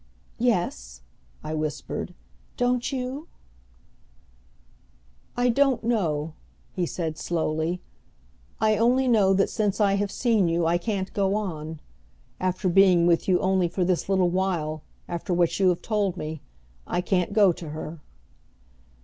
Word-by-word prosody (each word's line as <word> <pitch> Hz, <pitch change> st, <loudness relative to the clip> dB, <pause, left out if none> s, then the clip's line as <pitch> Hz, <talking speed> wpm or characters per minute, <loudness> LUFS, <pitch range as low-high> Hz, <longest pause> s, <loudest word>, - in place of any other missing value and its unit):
"Yes," 175 Hz, -, -1 dB, 0.4 s
I 155 Hz, -, -4 dB
whispered. 155 Hz, -1 st, -4 dB, 0.4 s
"Don't 245 Hz, +1 st, +1 dB
you?" 265 Hz, +4 st, -4 dB, 2.1 s
"I 245 Hz, 0 st, +3 dB
don't 270 Hz, 0 st, +2 dB
know," 165 Hz, -10 st, 0 dB, 0.4 s
he 180 Hz, -2 st, -2 dB
said 160 Hz, -3 st, -4 dB
slowly. 165 Hz, +1 st, -1 dB, 0.8 s
"I 215 Hz, 0 st, +3 dB
only 250 Hz, +4 st, +3 dB
know 205 Hz, -5 st, +4 dB
that 195 Hz, -, +3 dB
since 210 Hz, -2 st, -1 dB
I 200 Hz, -2 st, +3 dB
have 205 Hz, 0 st, -1 dB
seen 225 Hz, -7 st, +2 dB
you 165 Hz, 0 st, +1 dB
I 170 Hz, +1 st, +2 dB
can't 195 Hz, -1 st, -3 dB
go 195 Hz, 0 st, +1 dB
on. 160 Hz, -7 st, -4 dB, 0.6 s
After 185 Hz, +1 st, -1 dB
being 180 Hz, -1 st, +5 dB
with 170 Hz, -1 st, +2 dB
you 185 Hz, -2 st, +3 dB
only 190 Hz, -1 st, +2 dB
for 180 Hz, +1 st, -1 dB
this 185 Hz, +1 st, 0 dB
little 185 Hz, -2 st, +3 dB
while, 170 Hz, -5 st, -1 dB, 0.3 s
after 175 Hz, +1 st, -2 dB
what 170 Hz, 0 st, +1 dB
you 190 Hz, -2 st, +5 dB
have 175 Hz, -, -1 dB
told 205 Hz, -4 st, 0 dB
me, 155 Hz, -1 st, -5 dB, 0.5 s
I 175 Hz, -, 0 dB
can't 180 Hz, 0 st, 0 dB
go 200 Hz, -3 st, +5 dB
to 165 Hz, -2 st, -8 dB
her." 155 Hz, +1 st, -7 dB
185 Hz, 140 wpm, -25 LUFS, 170-210 Hz, 2.1 s, being